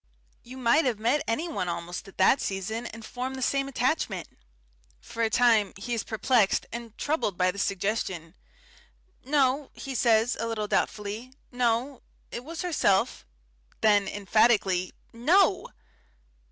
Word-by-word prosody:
You 255 +2 -11
might 260 +5 +3
have 245 -4 0
met 240 +7 +1
anyone 260 - -2
almost 170 +3 -5
at 195 - -15
that 195 +8 +4
season 220 +5 -3
and 225 -1 -10
formed 255 +3 -5
the 260 - -4
same 275 +2 +1
attachment." 245 - -1 0.7
For 230 - -7
a 225 - +2
time 225 -4 +3
he 240 +5 -4
is 230 - -1
perplexed 220 -2 +2
and 230 -1 -8
troubled 290 - -1
by 185 0 +3
this 200 +2 -4
suggestion. 190 -4 -2 0.9
"No," 275 0 +1
he 270 - -6
says, 230 -1 +3
a 230 - -1
little 215 -2 -2
doubtfully. 215 +5 -2 0.2
"No. 245 +2 0 0.3
It 240 - -6
was 325 +5 -6
herself."... 200 - +1 0.6
Then, 205 -2 +4
emphatically, 200 -3 +2 0.2
"No!" 305 - +3
230 Hz, 140 wpm, -27 LUFS, 200-260 Hz, 0.9 s, that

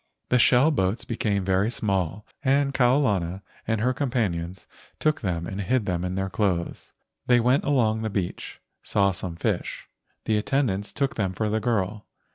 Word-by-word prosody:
The 125 - +4
shell 125 +6 +5
boats 95 -5 0
be¬ 115 - -3
came 100 -3 0
very 95 +3 +2
small 100 -3 -1 0.2
and 140 0 +2
Kau 125 0 +4
lana 95 -8 0 0.2
and 115 -1 +1
her 125 +3 +2
com¬ 140 +1 -1
panions 95 -7 -2 0.3
took 155 -1 +1
them 85 -4 -2
and 95 +4 -4
hid 120 +2 +1
them 90 -2 -1
in 90 0 -2
their 95 0 -1
clothes. 90 -2 -2 0.4
They 125 -1 +5
went 125 +4 +2
along 115 -6 +2
the 110 - -1
beach, 95 -4 -4 0.2
saw 100 -1 +2
some 90 -2 -5
fish. 85 - -2 0.4
The 110 - +2
attendants 105 -5 0
took 140 -1 -1
them 95 -4 0
for 105 +3 -1
the 110 +1 +1
girl. 105 -2 -1
105 Hz, 180 wpm, -25 LUFS, 95-125 Hz, 0.4 s, shell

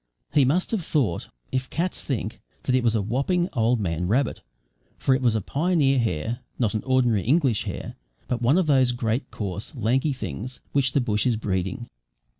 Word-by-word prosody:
He 145 -3 +5
must 165 +8 +1
have 215 -6 0
thought 130 - 0 0.2
(if 130 0 -1
cats 175 +3 -1
think) 115 -5 -3 0.2
that 130 - 0
it 130 -1 +3
was 115 -1 +2
a 105 - +1
whopping, 140 - +1
old 115 0 +2
man 90 -3 -1
rabbit, 120 +5 +1 0.6
for 135 - +2
it 130 - +1
was 120 -3 +3
a 110 - +1
pioneer 145 - +2
hare 115 +1 -1 0.2
not 115 -4 +1
an 110 - -1
ordinary 125 -5 +3
English 130 - +2
hare, - - -5 0.3
but 120 -1 -2
one 130 +7 +4
of 185 - +3
those 130 -4 +4
great 120 +2 -1
coarse, 100 - -5
lanky 130 +5 +1
things 125 - -5
which 130 -2 +2
the 140 - +3
bush 110 0 +1
is 120 -3 +2
breeding. 100 +4 -2
125 Hz, 190 wpm, -25 LUFS, 110-135 Hz, 0.6 s, He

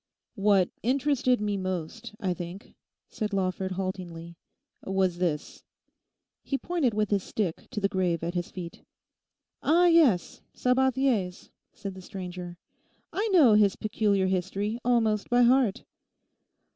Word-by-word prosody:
'What 195 -4 +3
interested 255 0 +1
me 205 -1 -1
most, 185 +5 -5
I 185 -2 0
think,' 175 +3 -8 0.3
said 215 -2 -4
Lawford 190 0 -1
haltingly, 175 -3 -5 0.5
'was 190 -2 0
this.' 165 -5 -2 0.8
He 275 - -2
pointed 285 -9 -1
with 210 -1 0
his 200 -1 +2
stick 185 -3 -3
to - - -4
the 200 - +2
grave 180 -4 -1
at 170 +1 -2
his 175 -1 -3
feet. 175 -2 -8 0.8
'Ah, 340 +4 +4
yes, 310 - +3
Sabathier's,' 250 -7 +1 0.2
said 200 -1 -6
the 185 - -10
stranger; 180 -2 -7 0.6
'I 420 +3 0
know 325 - +6
his 210 -2 +4
peculiar 205 -2 +1
history 190 +4 -1
almost 225 -4 +1
by 245 0 +4
heart. 245 -4 +3
200 Hz, 130 wpm, -27 LUFS, 185-245 Hz, 0.8 s, know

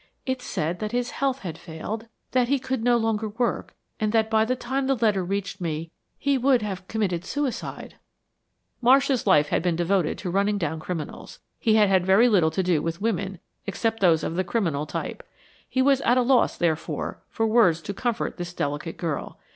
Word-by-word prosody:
It 260 -1 -2
said 170 -6 -2
that 215 +1 -4
his 245 0 -1
health 270 -1 -1
had 165 -3 -6
failed, 185 +7 -6 0.2
that 250 -1 +2
he 280 +2 +2
could 260 -2 -3
no 240 0 +4
longer 225 -1 0
work, 235 +3 -2 0.2
and 215 -2 +1
that 220 -1 +2
by 220 0 +4
the 255 +3 0
time 265 +2 -2
the 270 - +3
letter 215 -5 +2
reached 195 +1 -3
me 165 -1 -3 0.3
he 280 -1 +1
world 255 -2 +3
have 190 -3 -5
committed 190 -6 -1
suicide." 280 +5 -4 0.8
Marsh's 265 0 +4
life 150 -6 +5
had - - +1
been 175 -1 +1
devoted 175 0 +1
to 180 - -4
running 200 +2 +1
down 160 -4 -2
criminals. 160 -1 -6 0.2
He 220 -1 +3
had 210 -2 +5
had 190 -2 +3
very 195 +6 +5
little 180 -8 +4
to 175 +4 -1
do 175 -4 +2
with 165 0 -3
women 200 -3 -1 0.3
except 225 +3 -1
those 170 -4 +4
of 165 - -2
the 185 - +2
criminal 170 -6 -1
type. - - -4 0.5
He 260 - +2
was 275 0 +4
at 245 +2 +3
a 250 - +4
loss, 255 0 +3
therefore, 165 -2 -2
for 225 - -1
words 215 -7 +4
to 200 - -4
comfort 235 +2 -2
this 175 -1 -6
delicate 145 +3 -3
girl. 160 -5 -4
205 Hz, 195 wpm, -25 LUFS, 175-240 Hz, 0.8 s, life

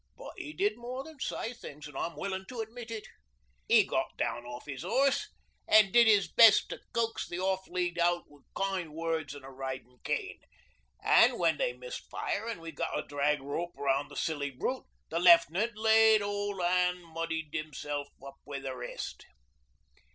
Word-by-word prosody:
But - - -9
'e 150 - -6
did 205 +7 0
more 250 +2 -5
than 315 -1 -13
say 235 -2 -3
things, 150 -10 -10
an' 150 - -13
I'm 170 - -3
willin' 190 +4 -4
to 250 -2 -7
admit 230 +1 -8
it. 220 -2 -5 0.6
'E - - +6
got - - -2
down 120 +1 -2
off 120 0 -8
his 140 -3 -6
horse 275 - +1 0.4
an' 215 -2 +6
did 235 +1 +6
'is 205 -3 +5
best 225 -2 +7
to - - -6
coax 230 -1 -1
the 175 - -4
off 190 0 -1
lead 175 -1 -2
out 175 0 +2
wi' 145 - -19 0.2
kind 190 -5 -2
words 160 -3 -2
an' 140 - -11
a 135 - -10
ridin' 130 -2 -7
cane. 415 -4 -2 0.6
An' - - +5
when - - +2
they - - +1
missed - - -8
fire 220 +3 -3
an' 205 -8 -5
we 165 0 -7
got 150 - -3
a - - -2
drag 145 0 0
rope 165 +5 -4
round 140 0 0
the - - -12
silly 145 -3 -1
brute 195 - -3 0.2
the 165 - -1
Left'nant 175 +5 +5
laid 220 -1 +5
'old 205 -1 -2
an' 180 0 +1
muddied 165 -2 -4
himself 145 -2 -4 0.2
up 140 0 -10
wi' 145 -1 -6
the 135 -1 -5
rest. 120 -1 -7
175 Hz, 185 wpm, -31 LUFS, 145-215 Hz, 0.6 s, best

